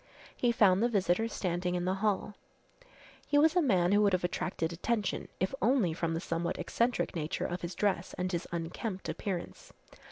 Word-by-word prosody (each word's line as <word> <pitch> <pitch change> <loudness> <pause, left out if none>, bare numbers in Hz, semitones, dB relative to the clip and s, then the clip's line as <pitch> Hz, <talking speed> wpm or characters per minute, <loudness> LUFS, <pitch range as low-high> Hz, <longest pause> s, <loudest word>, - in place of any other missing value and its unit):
He 245 - +2
found 200 -4 +4
the 240 - +3
visitor 200 0 +1
standing 180 -4 -2
in 175 0 -1
the 185 - +1
hall. 210 -1 0 0.9
He 290 - +2
was 315 +3 +5
a 355 - +5
man 185 - +3
who 205 +1 +5
would 200 -2 +3
have 180 - +1
attracted 175 -1 -2
attention, 210 +3 -1
if 190 +6 0
only 235 -9 +3
from 165 -1 -1
the - - -1
somewhat 170 -1 -2
eccentric 235 +5 0
nature 155 -1 -2
of 175 0 -3
his 170 +1 -5
dress 190 -3 0
and 185 0 -2
his 170 -1 -2
unkempt 175 +4 -4
appearance. 185 -4 -5
185 Hz, 185 wpm, -31 LUFS, 175-215 Hz, 0.9 s, was